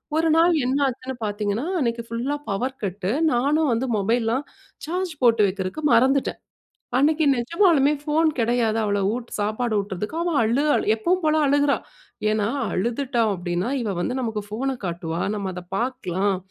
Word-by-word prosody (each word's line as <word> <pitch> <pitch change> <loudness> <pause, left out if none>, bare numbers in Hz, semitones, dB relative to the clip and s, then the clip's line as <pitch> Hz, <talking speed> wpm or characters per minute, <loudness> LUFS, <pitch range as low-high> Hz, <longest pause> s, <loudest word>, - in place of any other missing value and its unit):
ஒரு 325 0 +2
நாள் 335 +1 +5
என்னாச்சுன்னு 265 -1 -1
பார்த்தீங்கன்னா 210 +4 -2
அன்னைக்கு 235 -3 -1
ஃபுல்லா 245 +5 -2
பவர் 255 +7 -2
கட்டு 195 +1 -2 0.2
நானும் 285 +4 +2
வந்து 255 +3 -1
மொபைல்லலாம் 230 +5 0 0.4
சார்ஜ் 355 +1 -2
போட்டு 230 -2 +5
வைக்கிறதுக்கு 190 +10 -4
மறந்துட்டேன். 265 +4 +3 0.6
அன்னைக்கு 310 +2 +3
நிஜமாலுமே 300 +2 +3
போன் 315 +2 +3
கிடையாது. 230 -1 +1
அவள 205 -1 0 0.2
உட் 240 -1 -6
சாப்பாடு 215 +2 -1
ஊட்டுவதற்கு 205 - -4
அவ 345 -2 -1
அழு, 235 +6 +1 0.3
எப்போவும் 360 +10 0
போல 310 0 +3
அழுகுறா. 285 0 +3 0.5
ஏன்னா 215 -1 +1 0.2
அழுதுட்டான் 235 +1 0
அப்படின்னா 175 +5 -2
இவள் 200 -5 -2
வந்து 250 +8 -1
நமக்கு 220 -3 -2
ஃபோன 260 +5 -2
காட்டுவா. 170 -1 -3
நம்ம 195 -2 -3
அதை 180 - -7
பார்க்கலாம், 200 -6 -1
240 Hz, 140 wpm, -23 LUFS, 205-285 Hz, 0.6 s, நாள்